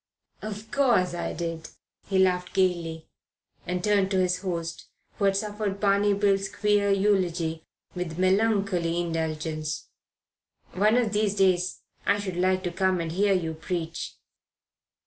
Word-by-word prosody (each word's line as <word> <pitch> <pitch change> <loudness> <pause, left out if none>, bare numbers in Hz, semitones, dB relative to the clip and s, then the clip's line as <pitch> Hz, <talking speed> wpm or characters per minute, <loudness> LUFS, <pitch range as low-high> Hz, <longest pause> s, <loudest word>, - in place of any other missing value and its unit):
"Of 215 0 -7
course 235 -11 +3
I 175 - -3
did." 165 -1 -4 0.4
He 195 - 0
laughed 180 -1 +2
gaily 170 -4 0 0.6
and 180 0 -2
turned 200 -2 +3
to 190 -1 +1
his 180 -1 +1
host, 170 -3 -4 0.3
who 200 - +2
had 195 0 +3
suffered 205 -1 -3
Barney 200 0 +3
Bill's 195 -1 +2
queer 205 -1 +2
eulogy 180 -5 +1 0.3
with 180 -3 -4
melancholy 190 -3 +2
indulgence. 155 -2 -3 0.8
"One 210 +5 +3
of 230 -4 +1
these 210 -1 +1
days 185 -2 +2 0.2
I 200 - +2
should 190 -3 -4
like 185 +1 +2
to 175 - -2
come 185 +1 +1
and 165 -1 -3
hear 200 +3 +2
you 165 -3 -1
preach." 165 0 -4
185 Hz, 140 wpm, -26 LUFS, 170-200 Hz, 0.8 s, course